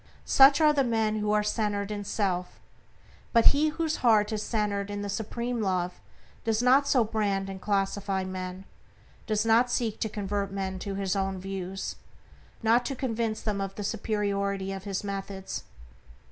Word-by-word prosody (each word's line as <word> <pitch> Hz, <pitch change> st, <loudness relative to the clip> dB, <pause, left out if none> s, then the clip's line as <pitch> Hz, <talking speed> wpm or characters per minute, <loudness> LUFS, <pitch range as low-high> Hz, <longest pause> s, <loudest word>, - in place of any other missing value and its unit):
Such 275 Hz, +2 st, +7 dB
are 305 Hz, -1 st, +5 dB
the 280 Hz, -2 st, +3 dB
men 220 Hz, -3 st, +1 dB
who 210 Hz, 0 st, 0 dB
are 210 Hz, 0 st, +3 dB
centered 210 Hz, -1 st, -1 dB
in 205 Hz, -1 st, -3 dB
self. 185 Hz, -3 st, -2 dB, 0.7 s
But 230 Hz, -2 st, +5 dB
he 300 Hz, +2 st, +2 dB
whose 320 Hz, 0 st, -1 dB
heart 220 Hz, -3 st, +4 dB
is 215 Hz, -, -1 dB
centered 205 Hz, -3 st, -1 dB
in 205 Hz, 0 st, -4 dB
the 205 Hz, -, -4 dB
supreme 235 Hz, +3 st, -3 dB
Love 180 Hz, -3 st, -1 dB, 0.4 s
does 220 Hz, -1 st, +1 dB
not 270 Hz, +3 st, +5 dB
so 255 Hz, -4 st, +4 dB
brand 200 Hz, -3 st, -1 dB
and 190 Hz, -1 st, -8 dB
classify 195 Hz, -1 st, 0 dB
men; 185 Hz, 0 st, -6 dB, 0.6 s
does 215 Hz, 0 st, +1 dB
not 230 Hz, +2 st, +4 dB
seek 230 Hz, -3 st, -1 dB
to 220 Hz, -, -1 dB
convert 200 Hz, -1 st, -2 dB
men 190 Hz, -1 st, -3 dB
to 195 Hz, 0 st, -4 dB
his 195 Hz, 0 st, -1 dB
own 195 Hz, -1 st, -1 dB
views, 190 Hz, 0 st, -5 dB, 0.7 s
not 230 Hz, +2 st, +4 dB
to 275 Hz, -, -3 dB
convince 230 Hz, -4 st, -2 dB
them 205 Hz, -2 st, -1 dB
of 195 Hz, 0 st, -4 dB
the 205 Hz, -, -5 dB
superiority 200 Hz, -2 st, -1 dB
of 195 Hz, 0 st, -6 dB
his 195 Hz, -1 st, -3 dB
methods. 195 Hz, -1 st, -5 dB
205 Hz, 170 wpm, -28 LUFS, 195-225 Hz, 0.7 s, Such